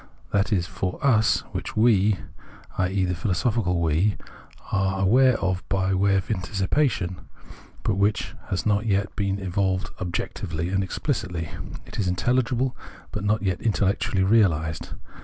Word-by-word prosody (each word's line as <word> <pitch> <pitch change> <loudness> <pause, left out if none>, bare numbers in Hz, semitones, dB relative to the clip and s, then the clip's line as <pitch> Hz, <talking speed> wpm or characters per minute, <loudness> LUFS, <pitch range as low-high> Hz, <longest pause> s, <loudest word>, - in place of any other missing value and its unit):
That 100 +1 +1
is 90 -5 +2
"for 90 +1 -3
us" 110 -5 +4
which - - -5
we 110 -3 +4 0.6
(i.e. 95 +1 +1
the 90 - -1
philosophical 90 0 0
"we") 85 +5 +2 0.6
are 95 -1 +1
aware 125 +5 +5
of 95 -1 -1
by 95 0 +1
way 100 +1 +3
of 95 +3 -1
anticipation, 95 0 0 0.7
but 95 - 0
which 100 +2 +1 0.2
has 95 - -1
not 105 +1 +1
yet 100 0 0
been 100 -1 0
evolved 95 -1 -1
objec 90 -1 -3
tively 85 +3 -3
and 95 0 +2
explicitly; 95 - -3 0.3
it - - -8
is 95 -3 +1
intellig 120 +7 +1
ible, 130 -1 0 0.4
but 105 - -4
not 105 +1 +1
yet 95 -3 -1
intellectually 100 -3 +1
realised. 85 -7 +2
95 Hz, 145 wpm, -25 LUFS, 90-105 Hz, 0.7 s, aware